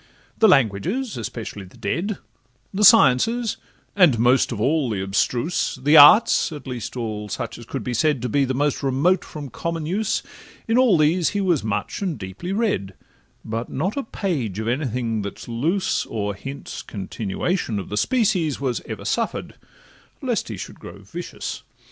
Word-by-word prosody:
The 220 - +6
languages, 180 - +2
especially 115 -3 -6
the 90 - -17
dead, 180 - -2 0.6
The 205 +2 0
sciences, 220 - +5 0.4
and 175 - +5
most 125 +4 +3
of 115 - -4
all 140 +3 +1
the 105 -3 -2
abstruse, 120 - 0
The 145 +4 +3
arts, 175 +8 +7
at 150 -2 -8
least 125 -1 -5
all 105 -3 -4
such - - -5
as - - -12
could - - -4
be 125 - -3
said 150 +3 +2
To - - 0
be 140 +4 +2
the 130 -1 -1
most 145 +1 0
remote 145 +7 +2
from 145 -4 -8
common 165 +5 -3
use, 205 +6 -1 0.4
In 225 - +1
all 240 -9 +5
these 160 +3 +3
he - - +1
was 180 -7 +1
much 110 - -3
and 185 -7 -2
deeply 95 - -6
read; 195 - -1 0.5
But 115 +2 -4
not 185 - -2
a 280 - -1
page 155 - -3
of 110 +1 -3
any 130 +5 0
thing 115 -2 -2
that 100 0 -6
's - - -11
loose, 155 +12 0
Or 105 -2 -2
hints 135 +8 -7
continuation 105 - -3
of 100 - -5
the 105 - -3
species, 195 - +1
Was 130 -4 -1
ever - - -6
suffer'd, - - -2 0.7
lest - - -1
he - - -6
should - - -8
grow - - -11
vicious. - - -6
135 Hz, 175 wpm, -22 LUFS, 115-180 Hz, 0.7 s, arts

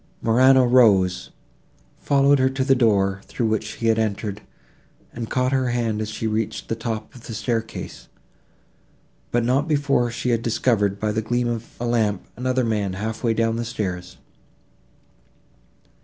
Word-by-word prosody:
Morano 130 +3 +5
rose, 105 -7 +4 0.7
followed 140 0 +3
her 130 0 +3
to 135 0 -2
the 135 0 +4
door, 100 -6 +2
through 120 - -3
which 110 0 -1
he 115 - -6
had 115 0 +3
entered, 105 -1 -2 0.7
and 115 -2 -6
caught 130 0 0
her 130 -2 +1
hand, 115 -3 -1
as 110 - -3
she 110 +1 -5
reached 110 0 -2
the 115 - 0
top 110 -1 -5
of 120 - -13
the 115 - -6
staircase, 115 +1 -4 1.2
but 120 -1 0
not 135 +5 +1
before 145 -5 +1
she 120 +2 -3
had 115 -1 +1
discovered, 110 -4 +1
by 110 0 0
the 110 +1 -1
gleam 120 +2 -1
of 120 -1 -3
a 120 - -3
lamp, 110 -5 0
another 130 +1 0
man 105 -4 -1
half 110 +5 -5
way 115 -2 +1
down 115 0 +1
the 120 - -2
steps. 90 -6 -5
115 Hz, 160 wpm, -22 LUFS, 110-125 Hz, 1.2 s, Morano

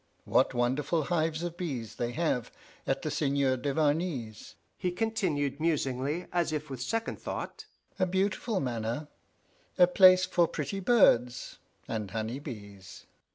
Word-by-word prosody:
What - - +2
wonderful 135 +7 +1
hives 160 0 0
of 175 -1 -4
bees 135 -11 -4
they 120 0 -1
have 155 -7 -1 0.4
at - - 0
the - - -2
Seigneur 140 -2 +1
Duvarney's!" 145 -4 -1 0.2
he 180 - -1
continued 175 - -1
musingly, 150 0 0
as 170 -3 +1
if 150 -1 -4
with 130 -2 -5
second 225 - -2
thought; - - -5 0.3
"a 185 - +3
beautiful 195 +3 0
manor 120 +2 -3 0.7
a 180 - +8
place 185 0 +7
for 175 -2 +2
pretty 155 +6 -4
birds 155 - +3 0.3
and 105 -3 -3
honey 110 +5 -3
bees!" 100 -9 -10
150 Hz, 135 wpm, -30 LUFS, 125-175 Hz, 0.7 s, a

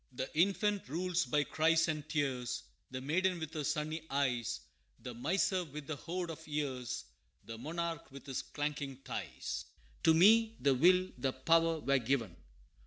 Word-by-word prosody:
The 130 +3 -5
infant 200 +1 +2
rules 180 +3 0
by 150 -1 +2
cries 165 +3 +3
and 155 -1 -3
tears 130 -5 -1 0.3
The 130 - -5
maiden, 180 +6 +1
with 160 -1 -5
her 155 -2 -2
sunny 155 +1 -1
eyes 125 - 0 0.4
The 125 - -6
miser, 180 - +1
with 150 -2 -8
the 155 - -3
hoard 175 +3 -4
of 160 0 -10
years 130 -5 -3 0.4
The 115 +1 -7
monarch, 165 0 -4
with 140 0 -11
his 135 -3 -3
clanking 145 -2 -3
ties. - - -4 0.4
To 160 - +5
me 225 +6 +6
the 140 -1 +4
will 180 +7 +4
the 130 +1 0
power 165 +3 +3
were 140 0 +3
given. 120 -6 0
150 Hz, 160 wpm, -34 LUFS, 135-170 Hz, 0.4 s, me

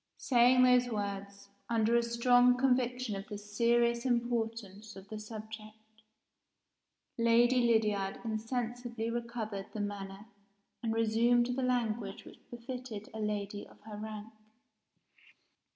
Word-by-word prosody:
Saying 250 0 +5
those 250 -1 +5
words, 200 -2 -5 0.2
under 230 0 +2
a 235 - +5
strong 245 +1 +4
conviction 250 -3 +1
of 195 +1 -6
the 210 - -6
serious 235 +3 +1
importance 225 -4 -2
of 195 0 -11
the 215 - -6
subject, 220 0 -10 1.2
Lady 240 +2 +4
Lydiard 210 -4 +1
insensibly 230 +1 -3
recovered 230 -4 -4
the - - -3
manner 200 0 -5 0.6
and 230 - -1
resumed 235 +2 +2
the 265 - -1
language 230 -5 -1
which - - -13
befitted 240 -3 -7
a 220 - -6
lady 205 -1 -3
of - - -19
her 215 0 -9
rank. 215 +1 -7
225 Hz, 120 wpm, -32 LUFS, 210-240 Hz, 1.2 s, Saying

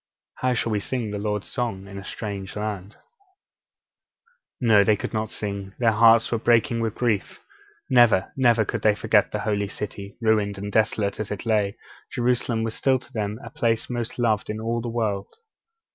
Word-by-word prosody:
How 130 -1 +1
shall 115 -1 -1
we 105 - +1
sing 115 0 -3
the 105 - -3
Lord's 105 -1 -2
song 115 -7 -3
in 100 0 -8
a - - -9
strange 100 -2 -6
land?' 105 -1 -4
(Verse - - -27 1.6
4.) 120 - 0
No, 105 -2 +7
they 105 +1 +4
could - - -5
not 110 0 -1
sing; 100 -2 -5
their 115 -2 +3
hearts 115 +1 +5
were 115 - +1
breaking 115 0 +3
with 115 -2 -1
grief. 115 -5 -1 0.5
Never, 120 -7 +4
never 120 -4 +3
could - - -3
they 105 -1 +4
forget 105 -1 +2
the 105 - -2
Holy 105 -2 0
City. 100 -1 -7
Ruined, 105 -3 +1
desolate 105 -1 +1
as 110 - -3
it 105 - -5
lay, 105 -2 +1 0.3
Jerusalem 120 -2 0
was 115 -1 -2
still 130 +2 +2
to 130 - -16
them 105 -2 -2
the - - -9
place 115 +1 0
most 120 -2 -3
loved 110 -4 +1
in 105 0 -3
all 115 +1 -1
the 120 - -4
world. 110 -4 -1
110 Hz, 190 wpm, -24 LUFS, 105-115 Hz, 1.6 s, No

